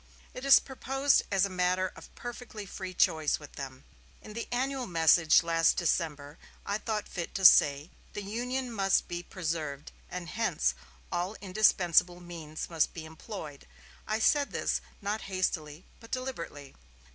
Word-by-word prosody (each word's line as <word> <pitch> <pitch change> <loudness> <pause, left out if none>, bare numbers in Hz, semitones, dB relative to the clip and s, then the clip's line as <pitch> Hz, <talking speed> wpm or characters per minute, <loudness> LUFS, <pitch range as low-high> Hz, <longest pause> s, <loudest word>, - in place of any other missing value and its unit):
It 255 - -7
is 275 - +9
proposed 270 +1 +1
as 195 -1 +3
a - - -3
matter 185 0 +1
of - - -12
perfectly 240 -3 -7
free 185 -1 -7
choice 155 -3 +2
with 145 -2 -12
them. 130 -1 -8 0.4
In 215 - -11
the 230 - -5
annual 260 0 -1
message 165 -1 +5
last 165 0 +3
December 155 -4 -1 0.3
I 205 +1 -1
thought 215 -1 -3
fit 175 -3 -6
to 190 - 0
say, 145 -1 +6 0.2
'The 205 - -5
Union 245 +5 -3
must 195 -4 +2
be 175 0 -4
preserved; 155 -5 -4 0.2
and 180 -1 -6
hence, 180 - 0 0.4
all 180 +5 -2
indispensable 185 -3 +3
means 165 -3 -7
must 165 -2 0
be 160 -2 -6
employed.' 160 -2 -9 0.4
I 215 - 0
said 285 +5 +3
this, - - -1 0.2
not 210 +2 -1
hastily, 175 -4 -2
but 230 - -14
deliberately. 170 - -5
185 Hz, 150 wpm, -30 LUFS, 160-220 Hz, 0.4 s, is